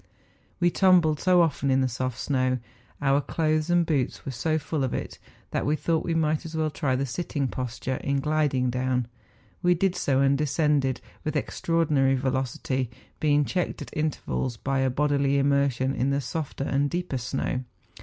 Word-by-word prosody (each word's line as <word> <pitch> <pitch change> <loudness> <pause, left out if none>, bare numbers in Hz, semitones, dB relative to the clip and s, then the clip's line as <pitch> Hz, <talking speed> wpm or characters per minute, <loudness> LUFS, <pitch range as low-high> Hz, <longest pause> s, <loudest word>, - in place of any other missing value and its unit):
We 175 -1 +3
tumbled 175 -6 +4
so 180 -1 +5
often 145 -3 0
in 135 0 +3
the 130 - +2
soft 130 0 -3
snow, 130 -1 +1
and - - -11 0.4
our 140 +1 +3
clothes 155 +2 0
and 175 -1 +3
boots 145 -6 -1
were 135 - -3
so 155 +6 0
full 155 -1 -2
of 130 - -1
it, - - -5 0.3
that - - -1
we 150 - +1
thought 160 +1 0
we 165 - -1
might 155 -1 +1
as 160 0 -7
well 155 -1 0
try 140 -4 0
the 135 +2 0
sitting 140 0 -2
posture 125 +1 -3
in 140 0 -1
gliding 140 -4 +1
down. 125 -1 0 0.5
We 180 -1 +4
did 185 +1 +1
so, 135 -6 +1
and 135 0 +4
descended 145 -3 +1 0.2
with 155 - -2
extraordinary 150 -2 +1
velocity, 130 -1 -1 0.3
being 145 -1 +3
checked 180 +3 -2
at - - -12
intervals 150 -5 -2
by 135 +2 -1
a 130 0 +2
bodily 140 +1 +1
immersion 140 -2 +2
in 135 0 0
the 140 0 +1
softer 140 +1 -4
and 140 +1 +1
deeper 175 -6 -2
snow. 130 +1 -2
140 Hz, 180 wpm, -26 LUFS, 130-155 Hz, 0.5 s, so